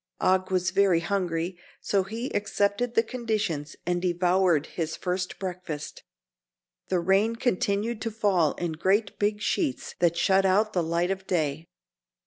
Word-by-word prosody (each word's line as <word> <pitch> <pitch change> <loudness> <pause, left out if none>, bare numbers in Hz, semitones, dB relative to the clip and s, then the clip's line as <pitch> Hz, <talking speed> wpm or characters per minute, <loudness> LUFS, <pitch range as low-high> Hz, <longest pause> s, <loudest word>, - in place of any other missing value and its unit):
Og 185 0 +2
was 185 0 +1
very 190 -3 +4
hungry, 175 -1 -2 0.2
so 200 - +1
he 225 +7 -5
accepted 205 +3 0
the 225 - +5
conditions 215 - -2
and 175 0 0
devoured 175 -3 +2
his 160 -2 -4
first 180 0 -3
breakfast. 180 -5 -6 0.9
The 185 - +1
rain 195 +6 +2
continued 215 -1 0
to 225 - -1
fall 200 -8 +2
in 175 -2 -3
great 195 +6 0
big 210 0 0
sheets 295 - -1
that 170 -1 +2
shut 190 +2 +3
out 205 +3 +2
the 180 - +2
light 170 +2 0
of 190 0 -4
day. 160 -2 -1
190 Hz, 145 wpm, -27 LUFS, 175-205 Hz, 0.9 s, the